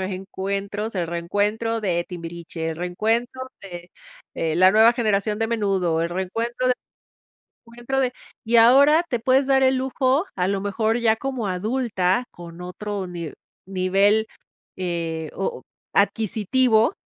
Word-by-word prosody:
reencuentros, 195 Hz, +3 st, -4 dB
el 175 Hz, -3 st, -2 dB
reencuentro 205 Hz, +6 st, -1 dB
de 175 Hz, -4 st, 0 dB
Timbiriche, 170 Hz, -1 st, -6 dB
el 160 Hz, -, -4 dB
reencuentro 230 Hz, +9 st, -1 dB
de 175 Hz, -3 st, -9 dB, 0.5 s
eh, 160 Hz, -1 st, -1 dB
la 185 Hz, +1 st, +6 dB
nueva 220 Hz, +3 st, +6 dB
generación 210 Hz, -3 st, 0 dB
de 225 Hz, -, +1 dB
Menudo, 195 Hz, -7 st, 0 dB
el 170 Hz, -, -1 dB
reencuentro 230 Hz, +8 st, -2 dB
de 250 Hz, -, +3 dB, 0.9 s
reencuentro 240 Hz, +3 st, -3 dB
de 255 Hz, -1 st, +1 dB, 0.3 s
y 235 Hz, +1 st, +3 dB
ahora, 280 Hz, +8 st, +6 dB
te 240 Hz, -, -1 dB
puedes 260 Hz, +3 st, +2 dB
dar 270 Hz, -1 st, +4 dB
el 260 Hz, 0 st, +3 dB
lujo 265 Hz, +4 st, +1 dB
a 180 Hz, 0 st, 0 dB
lo 195 Hz, 0 st, -1 dB
mejor 220 Hz, +3 st, 0 dB
ya 225 Hz, -1 st, +3 dB
como 255 Hz, -3 st, -3 dB
adulta, 205 Hz, +1 st, 0 dB
con 170 Hz, 0 st, -11 dB
otro 195 Hz, +2 st, -5 dB
ni 170 Hz, -4 st, -6 dB, 0.4 s
nivel 195 Hz, +3 st, +2 dB, 0.5 s
eh, 165 Hz, -3 st, -3 dB
o 475 Hz, -, -4 dB, 0.3 s
adquisitivo 225 Hz, -, +2 dB
205 Hz, 135 wpm, -23 LUFS, 180-235 Hz, 0.9 s, la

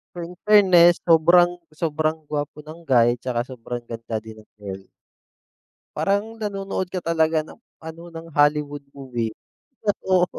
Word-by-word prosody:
In 175 Hz, 0 st, -7 dB
fairness, 185 Hz, -5 st, +6 dB
sobrang 175 Hz, +2 st, +5 dB, 0.2 s
sobrang 155 Hz, 0 st, -1 dB
gwapo 150 Hz, 0 st, -4 dB
ng 160 Hz, +2 st, -12 dB
guy 120 Hz, -3 st, +4 dB
'tsaka 120 Hz, -1 st, -2 dB
sobrang 120 Hz, -1 st, -6 dB
ganda 115 Hz, -1 st, -4 dB
din 110 Hz, -1 st, -12 dB
ng -, -, -63 dB
girl. 95 Hz, -1 st, -7 dB, 1.1 s
Parang 215 Hz, +3 st, -1 dB
nanonood 195 Hz, -3 st, -3 dB
ka 185 Hz, -, -4 dB
talaga 160 Hz, -1 st, +1 dB
ng 190 Hz, -, -14 dB, 0.2 s
ano, 160 Hz, +1 st, -10 dB
ng 165 Hz, 0 st, -9 dB
Hollywood 145 Hz, 0 st, +2 dB, 0.2 s
movie. 120 Hz, -4 st, -3 dB, 0.8 s
Oo. 185 Hz, -1 st, +5 dB
160 Hz, 135 wpm, -23 LUFS, 130-175 Hz, 1.1 s, fairness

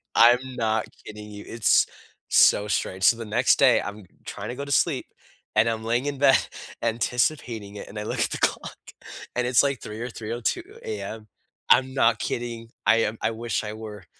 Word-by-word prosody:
I'm 120 Hz, +2 st, +7 dB, 0.2 s
not 110 Hz, -2 st, 0 dB, 0.2 s
kidding 105 Hz, 0 st, -9 dB
you, 105 Hz, 0 st, -9 dB
it's 115 Hz, -1 st, +3 dB, 0.4 s
so 105 Hz, -, +5 dB
strange, 95 Hz, -2 st, -2 dB
so 115 Hz, -, +6 dB
the 115 Hz, -, -6 dB
next 105 Hz, -, +3 dB
day, -, -, +5 dB
I'm 105 Hz, 0 st, -7 dB, 0.2 s
trying 100 Hz, +3 st, -6 dB
to 125 Hz, -, -5 dB
go 140 Hz, -, -5 dB
to 140 Hz, -, -7 dB
sleep, -, -, +1 dB, 0.5 s
and 110 Hz, +2 st, +4 dB
I'm 110 Hz, -1 st, -3 dB
laying 120 Hz, +4 st, 0 dB
in 140 Hz, -2 st, -3 dB
bed 135 Hz, -1 st, +6 dB, 0.4 s
anticipating 115 Hz, -2 st, -1 dB
it. -, -, -8 dB
And 105 Hz, -, -7 dB
I -, -, -4 dB
look -, -, -4 dB
at -, -, +1 dB
the -, -, -2 dB
clock, -, -, -1 dB, 0.6 s
and 125 Hz, 0 st, 0 dB
it's, 125 Hz, +2 st, +4 dB
like, 140 Hz, -3 st, -1 dB
3:00 105 Hz, +1 st, -7 dB
or 125 Hz, -, -4 dB
3:02 115 Hz, -, -3 dB, 0.2 s
AM. 270 Hz, -, -6 dB, 0.4 s
I'm 130 Hz, +1 st, +5 dB
not 115 Hz, -4 st, +3 dB
kidding. 115 Hz, -1 st, -4 dB, 0.2 s
I 115 Hz, -, +6 dB
am 110 Hz, 0 st, -1 dB
I -, -, +1 dB
wish 115 Hz, 0 st, -3 dB
I 105 Hz, 0 st, -5 dB
were. 105 Hz, -3 st, -9 dB
115 Hz, 195 wpm, -25 LUFS, 105-125 Hz, 0.6 s, I'm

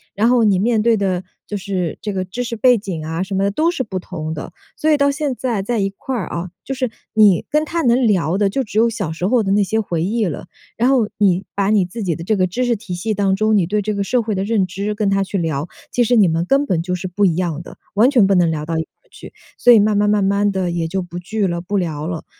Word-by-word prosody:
然 215 Hz, +3 st, +2 dB
后 245 Hz, -2 st, +4 dB
你 205 Hz, -3 st, +3 dB
面 220 Hz, +2 st, +2 dB
对 230 Hz, 0 st, +3 dB
的 190 Hz, -3 st, -1 dB, 0.2 s
就 210 Hz, -, -4 dB
是 190 Hz, -4 st, -3 dB
这 210 Hz, -, -3 dB
个 185 Hz, -1 st, -2 dB
知 225 Hz, +7 st, -4 dB
识 235 Hz, -1 st, -4 dB
背 250 Hz, +2 st, +5 dB
景 185 Hz, -7 st, -5 dB
啊， 160 Hz, +2 st, -3 dB
什 190 Hz, +1 st, -4 dB
么 195 Hz, -, +1 dB
的 200 Hz, -, +1 dB
都 310 Hz, +11 st, +1 dB
是 305 Hz, -7 st, -2 dB
不 190 Hz, -5 st, -4 dB
同 160 Hz, -3 st, -5 dB
的， 155 Hz, -, -7 dB, 0.2 s
所 310 Hz, -, 0 dB
以 300 Hz, -, +4 dB
到 280 Hz, 0 st, +3 dB
现 280 Hz, -2 st, -2 dB
在 235 Hz, -5 st, -2 dB
在 235 Hz, +4 st, -2 dB
一 195 Hz, -1 st, +1 dB
块 260 Hz, +6 st, -5 dB
儿 195 Hz, -, -3 dB
哦， 170 Hz, +1 st, -4 dB, 0.2 s
就 270 Hz, -, -3 dB
是 255 Hz, -2 st, -1 dB, 0.2 s
你 210 Hz, -5 st, +4 dB
跟 300 Hz, +1 st, +2 dB
她 330 Hz, +2 st, -2 dB
能 245 Hz, 0 st, +3 dB
聊 185 Hz, -5 st, +1 dB
的 200 Hz, -1 st, +2 dB
就 270 Hz, +6 st, -1 dB
只 215 Hz, -2 st, -6 dB
有 230 Hz, +1 st, +4 dB
小 205 Hz, -8 st, -3 dB
时 175 Hz, +3 st, -2 dB
候 235 Hz, +1 st, +2 dB
的 195 Hz, -, -1 dB
那 205 Hz, 0 st, +3 dB
些 220 Hz, +3 st, 0 dB
回 170 Hz, -6 st, -2 dB
忆 215 Hz, +4 st, 0 dB
了。 165 Hz, -6 st, -5 dB, 0.3 s
然 240 Hz, +3 st, +3 dB
后 255 Hz, -5 st, +3 dB
你 190 Hz, -2 st, +2 dB
把 200 Hz, 0 st, +1 dB
你 210 Hz, -3 st, +3 dB
自 205 Hz, +6 st, -7 dB
己 175 Hz, -4 st, -1 dB
的 165 Hz, -, -7 dB
这 215 Hz, +5 st, +1 dB
个 185 Hz, -2 st, +2 dB
知 245 Hz, +8 st, -2 dB
识 240 Hz, -1 st, +1 dB
体 205 Hz, -3 st, -7 dB
系 215 Hz, +5 st, -2 dB
当 195 Hz, -2 st, +1 dB
中， 215 Hz, +2 st, +2 dB
你 195 Hz, -4 st, +3 dB
对 210 Hz, +3 st, 0 dB
这 215 Hz, +1 st, -1 dB
个 200 Hz, -1 st, -1 dB
社 250 Hz, +5 st, +1 dB
会 220 Hz, -1 st, -2 dB
的 190 Hz, -, -1 dB
认 205 Hz, -2 st, +1 dB
知 200 Hz, +3 st, -3 dB
跟 210 Hz, -1 st, 0 dB
她 195 Hz, 0 st, +2 dB
去 195 Hz, +1 st, -3 dB
聊， 160 Hz, -2 st, -2 dB, 0.2 s
其 245 Hz, -, +2 dB
实 245 Hz, +1 st, +2 dB
你 210 Hz, -5 st, +5 dB
们 165 Hz, 0 st, 0 dB
根 275 Hz, +5 st, +3 dB
本 180 Hz, -, 0 dB
就 180 Hz, +1 st, -2 dB
是 180 Hz, +1 st, -5 dB
不 200 Hz, +3 st, +1 dB
一 170 Hz, -4 st, +2 dB
样 170 Hz, -3 st, -2 dB
的， -, -, -12 dB, 0.2 s
完 220 Hz, +6 st, +4 dB
全 240 Hz, -7 st, +5 dB
不 200 Hz, -, +3 dB
能 175 Hz, -2 st, +3 dB
聊 150 Hz, -1 st, -3 dB
到 165 Hz, +1 st, -3 dB
一 160 Hz, -, 0 dB
块 -, -, -23 dB, 0.2 s
儿 -, -, -37 dB
去， -, -, -12 dB, 0.2 s
所 245 Hz, -, +5 dB
以 225 Hz, -, +7 dB
慢 210 Hz, 0 st, +2 dB
慢 205 Hz, 0 st, +2 dB
慢 210 Hz, -1 st, +2 dB
慢 200 Hz, +1 st, +2 dB
地 190 Hz, -2 st, -1 dB
也 170 Hz, -1 st, -2 dB
就 190 Hz, +3 st, -2 dB
不 175 Hz, -1 st, -8 dB
聚 200 Hz, +3 st, -1 dB
了、 170 Hz, -1 st, -2 dB
不 200 Hz, +3 st, -2 dB
聊 155 Hz, -5 st, -2 dB
了。 165 Hz, -2 st, -5 dB
200 Hz, 320 characters per minute, -19 LUFS, 180-225 Hz, 0.3 s, 以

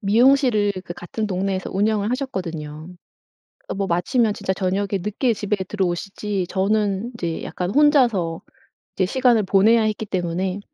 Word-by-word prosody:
미용실을 225 Hz, -1 st, +4 dB
그 175 Hz, -, -6 dB
같은 215 Hz, +5 st, -4 dB
동네에서 190 Hz, -1 st, -2 dB
운영을 210 Hz, +2 st, +1 dB
하셨거든요. 165 Hz, -, -4 dB, 0.8 s
어 -, -, -3 dB
뭐 195 Hz, 0 st, -1 dB
마치면 210 Hz, +6 st, +1 dB
진짜 190 Hz, -, -2 dB
저녁에 190 Hz, +1 st, -1 dB
늦게 215 Hz, +5 st, 0 dB
집에 210 Hz, -1 st, -1 dB
들어오시지 195 Hz, 0 st, -2 dB
저는 205 Hz, +3 st, 0 dB
이제 170 Hz, -7 st, -4 dB
약간 180 Hz, 0 st, -4 dB
혼자서 240 Hz, -, +3 dB, 0.5 s
이제 185 Hz, -, +2 dB
시간을 240 Hz, 0 st, +3 dB
보내야 215 Hz, +4 st, +4 dB
했기 215 Hz, 0 st, -1 dB
때문에 185 Hz, +1 st, -2 dB
200 Hz, 335 characters per minute, -22 LUFS, 185-220 Hz, 0.8 s, 미용실을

